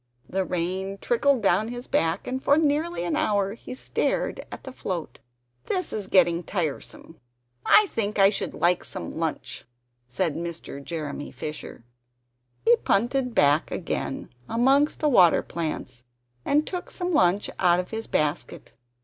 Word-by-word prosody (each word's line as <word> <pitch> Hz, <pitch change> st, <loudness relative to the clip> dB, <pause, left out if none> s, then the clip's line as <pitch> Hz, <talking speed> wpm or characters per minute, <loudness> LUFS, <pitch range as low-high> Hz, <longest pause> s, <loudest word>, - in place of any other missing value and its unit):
The 190 Hz, +1 st, -1 dB
rain 185 Hz, +2 st, -2 dB
trickled 250 Hz, +1 st, +2 dB
down 195 Hz, +3 st, +3 dB
his 245 Hz, +1 st, -6 dB
back, 165 Hz, +3 st, 0 dB
and 260 Hz, +1 st, -3 dB
for 285 Hz, -, +4 dB
nearly 315 Hz, -, +1 dB
an 175 Hz, -, -1 dB
hour 200 Hz, -1 st, +1 dB
he 235 Hz, -, -9 dB
stared -, -, -1 dB
at -, -, -8 dB
the 265 Hz, -, -7 dB
float. 180 Hz, -9 st, -5 dB, 0.5 s
"This 365 Hz, -3 st, -2 dB
is 205 Hz, -3 st, -3 dB
getting 175 Hz, -2 st, +4 dB
tiresome, 165 Hz, -2 st, -5 dB, 0.5 s
I 425 Hz, -, +7 dB
think 215 Hz, -, -2 dB
I 195 Hz, 0 st, +6 dB
should 205 Hz, -, -3 dB
like 175 Hz, +1 st, +2 dB
some -, -, -6 dB
lunch," 155 Hz, -6 st, -3 dB, 0.4 s
said 160 Hz, +6 st, -1 dB
Mr. 165 Hz, -4 st, -6 dB
Jeremy 145 Hz, -1 st, -5 dB
Fisher. 150 Hz, -5 st, -7 dB, 0.8 s
He 235 Hz, -, +7 dB
punted 245 Hz, +4 st, 0 dB
back 145 Hz, +3 st, +4 dB
again 165 Hz, -5 st, -3 dB, 0.2 s
amongst 270 Hz, +6 st, +3 dB
the 305 Hz, -, +3 dB
water 185 Hz, -, +5 dB
plants, 140 Hz, -7 st, -5 dB, 0.4 s
and 295 Hz, +2 st, +2 dB
took 360 Hz, -1 st, -5 dB
some 360 Hz, -1 st, -3 dB
lunch 190 Hz, -, +2 dB
out 175 Hz, -1 st, +4 dB
of 180 Hz, -, -4 dB
his 225 Hz, 0 st, -4 dB
basket. 150 Hz, +2 st, -2 dB
195 Hz, 150 wpm, -25 LUFS, 170-250 Hz, 0.8 s, I